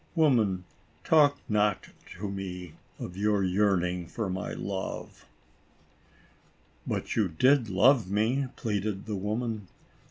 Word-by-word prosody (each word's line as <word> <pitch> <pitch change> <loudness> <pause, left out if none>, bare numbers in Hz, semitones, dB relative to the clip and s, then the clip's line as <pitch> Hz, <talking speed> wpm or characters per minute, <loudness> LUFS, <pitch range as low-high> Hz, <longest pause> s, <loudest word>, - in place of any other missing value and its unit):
Woman, 115 - +3 0.4
talk 145 -3 +5
not 105 -2 +1 0.3
to 100 +3 -4
me 90 -3 -6 0.2
of 90 - -7
your 105 0 +1
yearning 90 -2 +1
for 100 +1 -3
my 95 0 -3
love." 95 -1 -5 1.6
"But - - -2
you 105 -3 +3
did 125 - +3
love 110 +3 +4
me," 115 +7 +1
pleaded 105 -3 -2
the 105 - -3
woman. 105 +1 -3
105 Hz, 115 wpm, -28 LUFS, 95-115 Hz, 1.6 s, talk